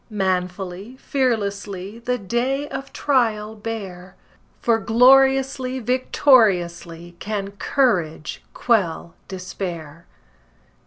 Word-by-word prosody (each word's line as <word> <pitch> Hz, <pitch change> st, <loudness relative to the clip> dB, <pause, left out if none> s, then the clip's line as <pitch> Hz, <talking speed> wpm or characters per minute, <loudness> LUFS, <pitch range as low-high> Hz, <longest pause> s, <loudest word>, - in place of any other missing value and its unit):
Manfully, 190 Hz, +2 st, -3 dB
fearlessly, 205 Hz, -6 st, -2 dB
The 250 Hz, +1 st, -1 dB
day 250 Hz, +7 st, -1 dB
of 270 Hz, -, -6 dB
trial 220 Hz, -6 st, 0 dB
bear, 195 Hz, -4 st, -7 dB, 0.4 s
For 230 Hz, -1 st, +2 dB
gloriously, 260 Hz, +3 st, +4 dB
victoriously, 190 Hz, -, +2 dB
Can 200 Hz, -2 st, -4 dB
courage 190 Hz, -, 0 dB
quell 185 Hz, -8 st, 0 dB
despair! 175 Hz, -4 st, -7 dB
210 Hz, 75 wpm, -22 LUFS, 180-250 Hz, 0.4 s, gloriously